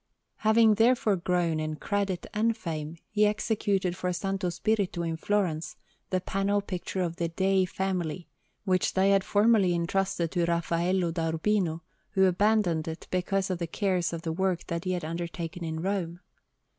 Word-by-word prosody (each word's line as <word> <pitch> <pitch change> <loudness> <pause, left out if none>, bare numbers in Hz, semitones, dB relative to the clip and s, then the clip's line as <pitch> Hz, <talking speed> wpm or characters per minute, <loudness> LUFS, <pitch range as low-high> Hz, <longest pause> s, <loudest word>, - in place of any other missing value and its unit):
Having 220 0 +5
therefore 225 -1 +3
grown 175 -3 0
in 155 0 -2
credit 200 +1 -2
and 225 +2 +1
fame, 160 -4 -5
he 210 0 +4
executed 205 -4 0
for 185 - -3
S. 180 +2 -2 0.3
Spirito, 195 -1 0
in 165 -1 -2
Florence, 165 -4 -1 0.3
the 185 - +1
panel 195 +2 0
picture 190 -1 -3
of 170 -1 -3
the 170 - 0
Dei 190 +2 +2
family, 180 -3 -3 0.4
which 185 -2 +1
they 195 +1 +4
had 195 -1 +4
formerly 205 -4 +3
entrusted 170 -1 0
to 175 -2 +1
Raffaello 170 +1 +1
da 165 -1 -1
Urbino, 170 -1 0 0.3
who 190 -2 +4
abandoned 185 -4 +2
it 160 0 -6
because 190 +1 0
of 180 - -2
the 170 - -2
cares 180 -1 0
of 165 -1 -5
the 165 -2 -2
work 185 0 0
that 170 +2 -4
he 185 - 0
had 175 -3 -3
undertaken 170 +1 -5
in 160 0 -3
Rome. 180 -3 -2
180 Hz, 165 wpm, -28 LUFS, 170-200 Hz, 0.4 s, Having